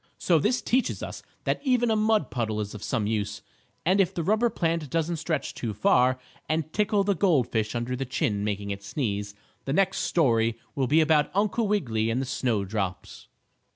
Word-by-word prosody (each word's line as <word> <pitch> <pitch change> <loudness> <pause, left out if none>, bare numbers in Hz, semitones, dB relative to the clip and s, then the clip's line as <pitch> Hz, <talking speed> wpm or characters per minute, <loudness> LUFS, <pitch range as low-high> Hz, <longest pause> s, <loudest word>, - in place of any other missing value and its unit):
So 170 -3 +3
this 235 - +1
teaches 255 +1 0
us - - -6 0.2
that - - -1
even 245 -4 +2
a - - +3
mud 215 -7 +2
puddle 110 -3 -1
is 105 -1 -4
of 105 - -8
some 115 -2 -1
use, 105 -1 -2 0.4
and 190 +4 +4
if 185 -2 +1
the 170 - -1
rubber 215 +7 +2
plant 165 -6 -1
doesn't 165 +2 -1
stretch 160 -3 -2
too 110 -4 -4
far, 125 +5 +3 0.3
and 155 0 -1
tickle 205 -1 +2
the 200 0 +2
gold 165 - +2
fish 110 0 -1
under 120 +2 -2
the 130 - -2
chin 105 -5 -1
making 100 -1 -2
it 100 0 -5
sneeze, 105 -3 -3 0.3
the 135 - -1
next 195 +3 +2
story 115 -8 +2 0.2
will 135 -2 0
be 155 +5 +4
about 155 -2 +3
Uncle 210 +2 +1
Wiggily 115 - 0
and 115 +3 0
the 135 - -1
snow 120 -5 -1
drops. 95 -2 -4
135 Hz, 195 wpm, -26 LUFS, 110-185 Hz, 0.4 s, and